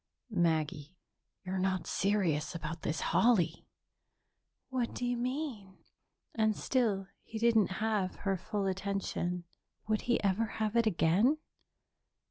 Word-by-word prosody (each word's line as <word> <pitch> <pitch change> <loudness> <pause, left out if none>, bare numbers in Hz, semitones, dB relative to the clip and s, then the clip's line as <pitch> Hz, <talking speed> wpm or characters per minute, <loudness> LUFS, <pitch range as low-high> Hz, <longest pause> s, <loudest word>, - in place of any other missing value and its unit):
"Maggie, 160 -2 0 0.5
you're 185 +1 -2
not 185 0 0
serious 175 -7 +1
about 165 0 -5
this 155 - -2
holly?" 185 -9 +3 1.0
"What 255 -3 -1
do 245 - -2
you 245 0 +1
mean?" 245 -6 -3 0.6
And 220 -1 +2
still 210 -7 0
he 225 - -7
didn't 220 -4 +3
have 210 -4 0
her 195 -1 +2
full 205 +2 -3
attention. 190 -2 -2 0.4
Would 215 -1 +1
he 240 - +4
ever 200 +3 +2
have 215 0 -1
it 230 -1 +4
again? 205 - +3
200 Hz, 120 wpm, -32 LUFS, 180-225 Hz, 1.0 s, he